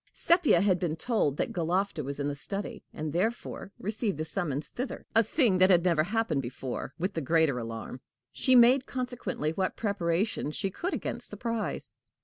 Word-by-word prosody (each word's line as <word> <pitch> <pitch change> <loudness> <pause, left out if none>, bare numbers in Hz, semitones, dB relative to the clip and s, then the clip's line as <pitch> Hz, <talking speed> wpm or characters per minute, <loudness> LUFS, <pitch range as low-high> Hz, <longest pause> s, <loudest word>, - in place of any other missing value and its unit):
Sepia 335 - +4
had 190 -3 +3
been 165 -3 -1
told 160 - 0
that - - -1
Galofta 180 +4 0
was 140 +2 -5
in 140 - -1
the 145 - -1
study, 195 +8 -5
and 155 -1 -4
therefore 205 +2 -2
received 210 - -2
the 155 - -2
summons 155 -4 -2
thither 255 +2 -5
a 225 - +6
thing 225 - +2
that 185 +1 +6
had 175 -3 +5
never 170 -4 +3
happened 185 -5 0
before 130 +1 -5
with 185 +4 -2
the 165 - -2
greater 155 -3 +2
alarm. 115 +2 -6 0.3
She 260 -2 +3
made, 250 +2 +6
consequently, 250 - -3
what 185 +3 -2
preparation 195 -4 0
she 190 +5 -3
could 360 - -2
against - - -5
surprise. 230 -2 -3
185 Hz, 175 wpm, -29 LUFS, 155-225 Hz, 0.3 s, a